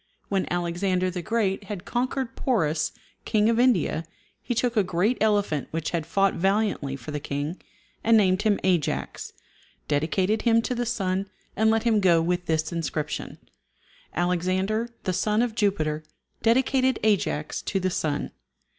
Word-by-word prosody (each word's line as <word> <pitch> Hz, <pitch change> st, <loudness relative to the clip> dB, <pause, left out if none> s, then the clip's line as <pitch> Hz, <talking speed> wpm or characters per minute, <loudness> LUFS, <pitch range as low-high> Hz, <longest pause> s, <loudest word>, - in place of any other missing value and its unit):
When 195 Hz, -2 st, 0 dB
Alexander 180 Hz, +1 st, 0 dB
the 180 Hz, 0 st, -4 dB
Great 210 Hz, -1 st, 0 dB
had 195 Hz, -3 st, -6 dB
conquered 255 Hz, +1 st, -2 dB
Porus, 155 Hz, -, 0 dB, 0.3 s
King 215 Hz, +1 st, +2 dB
of 230 Hz, -, +1 dB
India, 235 Hz, -10 st, +2 dB, 0.4 s
he 245 Hz, -, -3 dB
took 240 Hz, +1 st, 0 dB
a 215 Hz, -, +5 dB
great 185 Hz, +6 st, +1 dB
elephant 205 Hz, -9 st, +1 dB
which 160 Hz, -1 st, -3 dB
had 165 Hz, -2 st, -2 dB
fought 195 Hz, +2 st, +2 dB
valiantly 195 Hz, -7 st, 0 dB
for 135 Hz, +2 st, -8 dB
the 150 Hz, -, -2 dB
king, 145 Hz, +5 st, -4 dB, 0.4 s
and 225 Hz, 0 st, +5 dB
named 190 Hz, -2 st, +3 dB
him 210 Hz, -2 st, +2 dB
Ajax, 180 Hz, -5 st, -1 dB, 0.6 s
dedicated 185 Hz, +8 st, +1 dB
him 230 Hz, -1 st, +3 dB
to 250 Hz, -, -1 dB
the 240 Hz, -1 st, -2 dB
sun, 195 Hz, -4 st, -1 dB, 0.3 s
and 220 Hz, +2 st, +3 dB
let 225 Hz, 0 st, +2 dB
him 225 Hz, -3 st, +3 dB
go 175 Hz, -4 st, +4 dB
with 175 Hz, +2 st, -1 dB
this 160 Hz, 0 st, 0 dB
inscription, 155 Hz, -3 st, -3 dB, 0.8 s
"Alexander, 185 Hz, +6 st, 0 dB
the 185 Hz, -, -1 dB
son 210 Hz, +5 st, +2 dB
of 240 Hz, -2 st, -1 dB
Jupiter, 175 Hz, -9 st, 0 dB, 0.4 s
dedicated 260 Hz, +2 st, +3 dB
Ajax 200 Hz, -8 st, 0 dB
to 195 Hz, -, -1 dB
the 185 Hz, 0 st, 0 dB
sun." 150 Hz, -4 st, -2 dB
190 Hz, 155 wpm, -25 LUFS, 170-220 Hz, 0.8 s, a